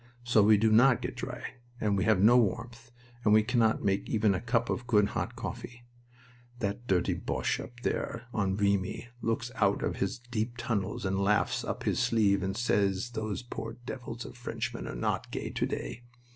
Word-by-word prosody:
So 120 -2 +4
we 105 +1 +6
do 110 +1 +3
not 120 +3 +5
get - - -4
dry, - - -6 0.4
and 105 -2 +1
we 95 - +1
have 110 -4 +4
no 110 +5 +6
warmth, 120 +1 0 0.3
and 105 0 +5
we 110 - +6
cannot 115 -1 +2
make 100 0 0
even 110 -3 +3
a 95 - -2
cup 120 0 +1
of 120 - -3
good 105 -4 +4
hot - - -3
coffee. 120 0 -7 0.7
That 110 +2 -3
dirty 90 -3 +2
Boche - - -1
up 120 - -9
there 115 +1 -2
on 95 -2 0
Vimy 100 +2 0
looks 115 +2 -1
out 100 -5 +1
of - - -1
his 95 - -1
deep 120 -1 -3
tunnels 105 -5 -2
and 95 0 0
laughs 105 +1 +2
up - - -4
his - - 0
sleeve 100 -4 +3
and 95 +1 -2
says 100 -1 +1
those 110 0 -3
poor 115 -2 -6
devils 120 -2 -6
of - - -9
Frenchmen 120 0 -4
are - - -5
not - - -1
gay - - -4
to - - 0
day! 120 - -5
110 Hz, 190 wpm, -30 LUFS, 100-120 Hz, 0.7 s, we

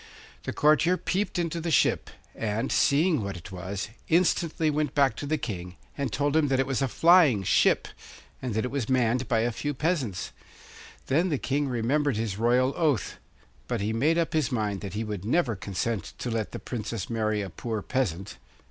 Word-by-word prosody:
The - - -2
courtier 155 +4 +3
peeped 195 +2 -1
into 170 -1 -1
the 170 - -2
ship, 160 - +2 0.2
and, 110 0 -2
seeing 150 0 +3
what 100 -2 -4
it 85 - -11
was, 95 +2 -5 0.2
instantly 165 -2 +2
went 150 -2 -1
back 135 -6 +3
to 145 - -5
the 155 +2 +1
King 90 -9 -5 0.2
and 140 -2 -2
told 145 0 0
him 160 -2 +4
that 135 -1 +1
it 135 - +3
was 135 0 -1
a 135 - +2
flying 160 - +5
ship, - - +3 0.5
and 125 -5 -3
that 110 - 0
it 125 - -4
was 135 -4 -2
manned 125 -1 +2
by 115 -1 +2
a 120 +1 +1
few 145 +5 -3
peasants. 140 - -1 0.7
Then 165 +7 +2
the 150 - 0
King 140 +2 -1
remembered 130 +2 0
his 110 -3 -2
royal 125 +3 +3
oath; 150 - 0 0.5
but 120 -2 -1
he 105 +2 -1
made 150 +9 +2
up 165 -1 0
his 155 -7 +1
mind 105 -5 -1
that 100 -1 -6
he 110 - -1
would 105 -4 -5
never 120 +1 +1
consent 100 +3 -3
to 120 - -4
let 110 -4 -2
the - - -5
Princess 115 -4 -5
marry 110 -2 -1
a 95 - -7
poor 110 0 -4
peasant. 100 -7 -2
125 Hz, 195 wpm, -27 LUFS, 110-150 Hz, 0.7 s, flying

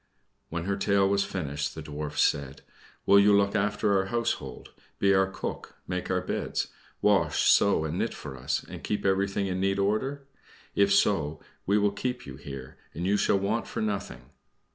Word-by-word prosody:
When 85 0 -3
her 100 +2 -1
tale 100 -1 +3
was 100 0 +2
finished 75 -5 -3
the 80 - -6
Dwarfs 75 0 -2
said, 70 0 -1 0.4
"Will 100 - +7
you 100 0 +6
look 100 +1 +2
after 105 0 +1
our 95 - 0
household 100 - -3 0.3
be 100 0 +3
our 95 0 +4
cook, 95 - -6
make 90 0 -3
the 90 - +1
beds, - - -2 0.3
wash, - - +3
sew, 100 -6 +4
and 80 +3 -3
knit - - -1
for 65 - -8
us, 65 +4 -2
and - - -10
keep 105 - -2
everything 100 +1 +1
in 95 -1 -2
neat 95 +1 +1
order? 120 +8 -1 0.5
If 100 0 +3
so, 80 -7 +2 0.3
we 100 +2 +4
will 105 -1 +3
keep 125 +4 -3
you 65 -1 -9
here, 70 -2 -9 0.2
and 85 +3 -3
you 100 +2 +3
shall 100 - +3
want 100 +4 -1
for - - -5
nothing." 100 -2 -4
95 Hz, 185 wpm, -28 LUFS, 80-100 Hz, 0.5 s, Will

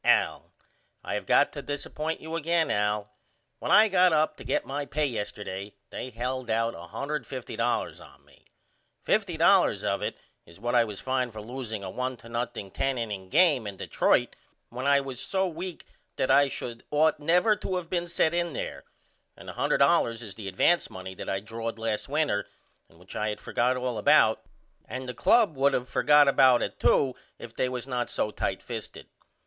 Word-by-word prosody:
AL: - - +2 0.5
I - - -4
have - - -3
got - - +4
to - - -5
disappoint 150 +2 -4
you 160 +1 -5
again 165 -1 +1
Al. 105 0 0 0.5
When - - -4
I 220 - +8
got 185 -2 +4
up 155 0 +2
to - - -10
get - - -1
my 145 +2 -3
pay 150 +3 -1
yesterday 105 -5 -5 0.2
they 130 - -5
held 125 +1 -4
out 115 +1 +1
$150.00 130 -4 -3
on - - -18
me. - - -23 0.6
$50.00 - - +3
of - - 0
it - - -3 0.3
is 85 +2 -16
what 120 +3 -2
I 120 -1 +5
was 105 -3 -7
fined 130 -2 -1
for 110 - -8
loosing 110 -2 -6
a 95 - -5
1 130 +2 -3
to 115 - -14 0.2
0 110 -5 -8
10 135 -1 0
inning 105 -5 -4
game 145 - +4
in 100 -1 -7
Detroit - - +1 0.3
when 125 +3 -4
I 140 0 +5
was 135 -3 -6
so 190 0 0
weak 175 +1 -6 0.3
that - - +1
I 140 0 +6
should 120 -3 -6
ought 155 +1 +3
never 180 +8 +3
to 185 - -2
of 180 -2 -5
been 175 0 -2
sent 170 -1 +1
in 175 -2 -1
there - - -5 0.5
and - - -13
the - - -6
$100.00 115 0 +2
is 105 -4 -7
the 100 0 -8
advance 135 - +2
money 95 0 -8
that - - -7
I 95 - 0
drawed 115 +2 -5
last 110 +2 -3
winter 145 -9 0 0.4
and 80 - -22
which 90 +3 -13
I 105 0 -1
had 105 - -4
forgot 125 +2 0
all 125 -3 -2
about 125 -4 +5 0.4
and 130 0 -6
the 125 - -4
club 200 - +3
would 140 +1 +3
of 125 - -2
forgot 145 +2 +5
about 130 -3 +5
it - - -5
to 130 -2 +3 0.2
if 115 -1 -11
they 130 - 0
was 125 -1 -4
not 125 -2 -2
so 105 - -1
tight - - -3
fisted. - - -7
125 Hz, 190 wpm, -27 LUFS, 110-150 Hz, 0.6 s, I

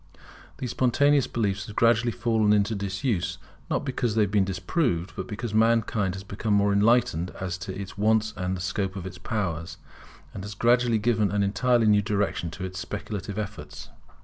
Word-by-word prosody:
These 125 -3 -4
spontaneous 135 +3 +3
beliefs 100 -3 -1
have 105 - -9
gradually 115 0 +3
fallen 110 -3 +2
into 105 +1 +2
disuse, 100 0 -2 0.3
not - - -1
because 125 -4 -1
they 110 - +4
have 100 - -1
been 100 -2 +3
disproved, 95 - -1
but 95 - -5
because 105 +1 -5
mankind 110 -4 +2
has 95 - -7
become 100 +1 -1
more 100 0 +3
enlightened 105 -4 +3
as 90 -2 -3
to 95 +1 -6
its 100 0 -8
wants 110 0 +2
and 95 -1 -2
the - - -6
scope 95 +1 -2
of 95 -2 -6
its 95 - -8
powers, 90 -8 -3 0.6
and 95 - -6
has 100 0 -7
gradually 120 +1 +3
given 110 -2 +1
an 100 0 +1
entirely 115 +4 +2
new 105 -1 +5
direction 100 -4 -1
to 90 +3 -8
its 90 -1 -6
speculative 100 +2 -5
efforts. 105 0 -6
105 Hz, 180 wpm, -26 LUFS, 95-115 Hz, 0.6 s, new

